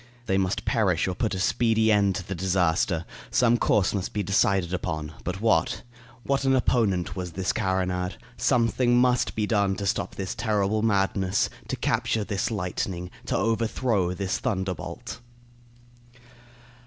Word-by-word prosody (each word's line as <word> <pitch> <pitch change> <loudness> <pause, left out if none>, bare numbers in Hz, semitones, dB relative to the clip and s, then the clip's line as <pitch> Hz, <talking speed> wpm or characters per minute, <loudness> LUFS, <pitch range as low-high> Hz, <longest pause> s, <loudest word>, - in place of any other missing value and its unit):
They 95 -2 +1
must 95 +1 -1
perish 95 -9 +1
or 95 - -1
put 105 +2 -1
a - - -3
speedy 110 +2 +2
end 100 -2 +3
to 95 - -5
the 100 - -3
disaster; 90 -2 +1 0.2
some 120 -1 +3
course 100 -2 +2
must 100 -2 -3
be 105 - -1
decided 100 -2 +2
on; 80 -1 -3
but 95 +2 -4
what? 115 -1 +2 0.4
What 140 0 0
an 135 0 +3
opponent 110 -8 +1
was 90 -3 -5
this 95 +2 -1
carronade! 90 -2 -1 0.2
Something 120 +1 +2
must 125 0 +2
be 110 - 0
done 100 -3 +1
to 100 - -4
stop 100 - -1
this 95 -2 -3
terrible 110 -2 0
madness 95 -2 +1 0.2
to - - -2
capture 110 - 0
this 100 -2 -2
lightning 90 -3 -3 0.2
to - - 0
overthrow 110 -3 0
this 95 0 -2
thunderbolt. 95 -7 -4
100 Hz, 150 wpm, -26 LUFS, 90-110 Hz, 0.4 s, end